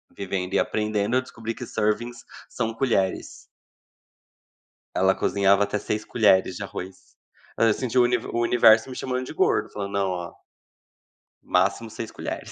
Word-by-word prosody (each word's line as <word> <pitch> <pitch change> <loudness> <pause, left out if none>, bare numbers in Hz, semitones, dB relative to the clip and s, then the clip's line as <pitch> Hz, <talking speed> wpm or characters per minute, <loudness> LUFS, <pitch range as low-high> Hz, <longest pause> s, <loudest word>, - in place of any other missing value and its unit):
Vivendo 95 -2 -4
e - - +3
aprendendo, 105 +1 0
eu 130 - +3
descobri 115 -3 -7
que - - -7
"servings" 115 +3 -2 0.3
são 115 -2 -2
colheres. 110 -7 0 1.6
Ela 95 +1 +4
cozinhava 100 0 +3
até 105 - -1
6 105 +1 -3
colheres 95 -5 +3
de 100 - -5
arroz. 95 -1 -9 0.4
Hã, 115 -1 +5
senti 130 +2 -3
o 125 - +7
univer 120 -1 0
o 120 - 0
universo 115 0 +5
me 130 - -7
chamando 130 0 -3
de - - -8
gordo, - - +1
falando: 100 -1 -5
"Não, 100 -1 +1
ó" 90 -1 -5 1.1
"máximo 115 -1 +1
6 110 0 -7
colheres". - - -6
110 Hz, 155 wpm, -24 LUFS, 100-120 Hz, 1.6 s, o